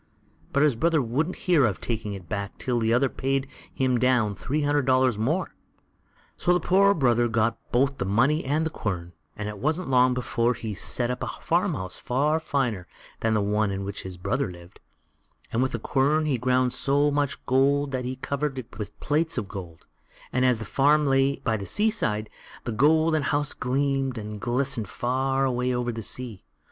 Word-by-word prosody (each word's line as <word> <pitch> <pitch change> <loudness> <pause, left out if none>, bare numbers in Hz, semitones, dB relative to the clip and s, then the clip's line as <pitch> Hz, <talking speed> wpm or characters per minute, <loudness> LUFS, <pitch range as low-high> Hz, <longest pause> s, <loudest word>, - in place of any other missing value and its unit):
But 140 - +3
his 150 -5 +3
brother 160 +5 +2
wouldn't 140 +8 -1
hear 170 -6 +4
of 110 -7 +1
taking 110 -3 -3
it 95 -3 -9
back 100 0 -4
till 125 -2 -1
the 110 0 +1
other 125 +4 +3
paid 135 +1 -1 0.2
him 130 -2 +1
down 125 -5 +2
three 145 +10 -2
hundred 145 -2 +1
dollars 130 -4 +3
more. 155 +12 -1 0.8
So 180 - +2
the - - +2
poor 195 +4 +4
brother 120 -5 +3
got 115 0 0
both 135 +3 +2
the 95 - -2
money 130 - +2
and 150 +4 0
the 160 - -2
quern, 90 - -4 0.2
and 105 - -4
it 105 -1 -6
wasn't 155 - -1
long 125 0 +4
before 120 -1 0
he 110 -2 -5
set 120 +5 0
up 125 - -4
a - - -2
farmhouse 95 -1 -1
far 150 +5 +1
finer 125 - -1 0.3
than 110 -1 +1
the 105 - +2
one 105 +1 +1
in 100 0 -3
which 100 0 -4
his 95 -1 -7
brother 130 +5 -1
lived, 85 +2 -14 0.7
and 115 - +1
with 130 - 0
the - - 0
quern 145 +6 +1
he 135 -5 0
ground 125 0 +2
so 145 +1 +2
much 145 -1 -1
gold 140 +2 +2
that 130 -1 -2
he 125 +1 -3
covered 140 +1 -3
it 125 -3 -8
with 105 - -7
plates 155 +1 0
of 105 -5 -2
gold; 90 -5 -9 0.5
and 125 - +2
as 125 -2 +3
the 110 - -6
farm 145 +6 +3
lay 135 0 +3
by 110 - -1
the 100 - -6
sea 215 +1 +2
side, 110 - -1 0.4
the 120 - -3
golden 155 +6 +3
house 145 +1 0
gleamed 135 0 -1
and 105 -1 -6
glistened 125 -3 0
far 135 +2 0
away 125 -1 0
over 125 -1 -1
the 115 -1 -5
sea. 110 -4 -4
130 Hz, 195 wpm, -26 LUFS, 110-140 Hz, 0.8 s, hear